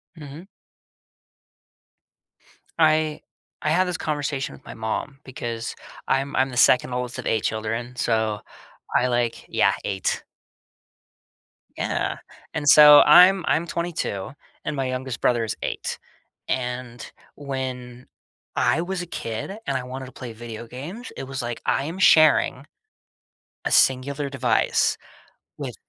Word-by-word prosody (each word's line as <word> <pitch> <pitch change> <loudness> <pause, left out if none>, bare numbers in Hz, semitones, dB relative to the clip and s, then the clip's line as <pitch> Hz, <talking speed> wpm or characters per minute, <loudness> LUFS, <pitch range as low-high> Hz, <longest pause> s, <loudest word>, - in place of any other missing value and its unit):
Mhm. 155 +3 -10 2.3
I 155 -1 +3 0.4
I 150 - 0
had 185 +3 +3
this 180 - -2
conversation 145 -3 -3
with - - -15
my - - -8
mom, 115 +5 -4
because 115 -3 -5 0.3
I'm 135 +2 0
I'm 130 +1 +2
the 125 - -7
2nd 125 0 +4
oldest 125 0 -3
of - - -6
8 110 - 0
children, 115 +3 -3
so, 110 -3 0 0.6
I, 125 - +3
like 120 -1 -1
Yeah, - - +2
8. 95 -2 -1 1.5
Yeah, - - -2 0.4
and, 145 - -3
so, 150 0 +10
I'm 180 +4 +7
I'm 165 +2 +1
22, 160 - -3 0.3
and - - -2
my 135 -1 -1
youngest 130 -1 -4
brother 120 -2 +2
is 110 - -3
8, - - -4 0.5
and 125 -1 -4 0.3
when 130 -3 -6 0.5
I 165 - +2
was 185 +1 -3
a 175 - -5
kid 115 - -5
and 135 - 0
I 125 - -5
wanted 130 +1 -7
to - - -12
play 120 -3 -8
video 115 0 -8
games, 165 - -8
it - - -5
was 130 0 -4
like, 120 -1 -5
"I 135 - +1
am 170 +5 -6
sharing 155 -5 +5 1.0
a - - -1
singular 140 +2 +3
device 130 -3 +1 0.6
with, - - -5
130 Hz, 135 wpm, -23 LUFS, 120-150 Hz, 2.3 s, so